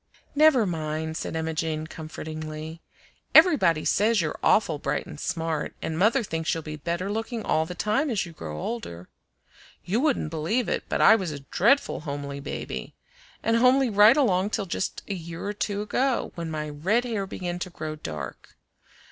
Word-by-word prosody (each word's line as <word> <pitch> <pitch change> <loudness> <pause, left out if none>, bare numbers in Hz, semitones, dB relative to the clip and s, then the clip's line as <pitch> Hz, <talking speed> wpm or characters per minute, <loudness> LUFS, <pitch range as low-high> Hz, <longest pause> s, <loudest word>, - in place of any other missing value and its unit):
"Never 295 -6 +5
mind!" 160 -2 -3
said - - -4
Emma 160 0 -2
Jane 155 0 -2
comfortingly. 155 0 -7 0.5
"Everybody 185 - +6
says 220 +1 +3
you're 155 -3 -2
awful 165 -8 +3
bright 140 0 -2
and 160 -5 -10
smart, 165 -3 -2
and 160 - -3
mother 220 +9 +3
thinks 165 -4 -2
you'll 165 - -4
be 155 0 -6
better 170 +5 -3
looking 225 +1 -3
all 160 0 +1
the 180 - -6
time 215 - +1
as 215 -6 0
you 170 - -9
grow 75 - -7
older. 90 - -5 0.8
You 205 +6 +1
wouldn't 270 - +1
believe 165 +10 0
it, - - -1
but - - 0
I 220 - +8
was 190 -6 -2
a 145 -2 -6
dreadful 220 - +2
homely 140 -1 -5
baby, 140 - -6 0.5
and 230 0 +3
homely 255 +1 +4
right 210 +5 +7
along 200 -8 +2
till 210 -2 -2
just 190 - -3
a 200 - -2
year 170 -1 -6
or 205 - -2
two 205 0 -2
ago, 255 +3 0
when 170 -1 -5
my 155 -1 -3
red 180 +11 +1
hair 220 -5 -2
began 175 -1 -4
to 185 - -4
grow 155 -3 -5
dark. 75 - -7
170 Hz, 180 wpm, -26 LUFS, 155-220 Hz, 0.8 s, I